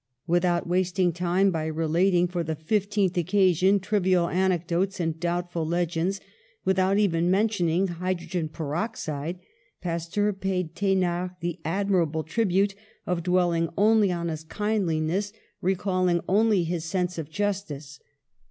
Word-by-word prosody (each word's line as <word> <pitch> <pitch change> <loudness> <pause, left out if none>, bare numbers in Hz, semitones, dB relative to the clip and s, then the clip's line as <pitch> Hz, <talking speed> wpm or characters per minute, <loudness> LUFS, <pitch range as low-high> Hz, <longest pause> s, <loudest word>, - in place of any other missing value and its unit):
Without 175 0 +1
wasting 180 0 +1
time 180 +3 +2
by 160 -2 -2
re 160 +1 -2
lating 175 +2 +3
for 175 -1 -2
the 160 0 -3
fifteenth 200 +3 0
occasion 185 +1 +3
trivial 185 -3 +2
anec 180 -1 +1
dotes 185 +3 -1
and 165 -2 -2
doubtful 175 -1 -2
legends, 170 +3 -1 0.5
without 190 +1 +2
even 175 -4 +2
men 200 +4 +3
tioning 185 -3 +1
hydrogen 175 -1 -3
peroxide, 160 0 -3 0.4
Pasteur 175 +4 -1
paid 185 -3 -2
The 195 -1 +1
nard 180 0 -1
the 175 +1 -3
admirable 170 -3 0
tribute 195 +2 +1 0.3
of 180 -1 -1
dwelling 175 -2 +1
only 210 -1 +4
on 170 -1 -2
his 160 -1 -5
kindliness, 195 0 -1 0.3
recalling 185 -1 +1
only 205 -1 +3
his 170 -1 -2
sense 180 0 -2
of 155 -2 -5
justice. 155 -7 -3
180 Hz, 135 wpm, -26 LUFS, 170-195 Hz, 0.5 s, only